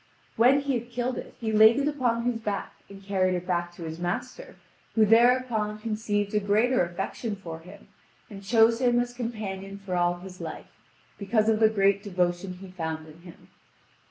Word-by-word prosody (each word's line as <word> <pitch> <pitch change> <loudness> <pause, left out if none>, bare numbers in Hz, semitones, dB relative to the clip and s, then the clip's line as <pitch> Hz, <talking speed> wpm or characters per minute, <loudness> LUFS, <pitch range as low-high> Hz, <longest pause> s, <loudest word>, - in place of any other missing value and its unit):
When 255 +5 +5
he 280 -1 -1
had 240 +1 -13
killed 245 +1 -2
it - - -10
he 225 -2 -2
laid 220 +2 +7
it 280 +1 +1
upon 245 -6 0
his 240 -1 -1
back 205 -3 -4 0.2
and 195 0 -12
carried 185 -2 +1
it 180 0 -4
back 175 -1 -1
to 170 - -9
his 160 0 -6
master, 175 - -4 0.4
who 220 -1 +5
thereupon 230 -1 +3
conceived 215 -2 -2
a 210 - +3
greater 215 +4 +2
affection 195 +5 -4
for 165 -5 -8
him, 170 +2 -14 0.4
and 200 -4 -10
chose 225 +3 +4
him 240 -1 +3
as 245 0 -1
a - - -22
companion 200 -5 -5
for 195 -2 -5
all 175 0 +2
his 185 0 -11
life, - - -8 0.4
because 215 +2 +1
of 220 -1 +2
the 220 -1 +6
great 200 -2 +2
devotion 180 -2 -1
he 185 +1 -11
found 160 -3 -5
in 155 +2 -15
him. 175 -1 -15
205 Hz, 190 wpm, -27 LUFS, 185-235 Hz, 0.4 s, laid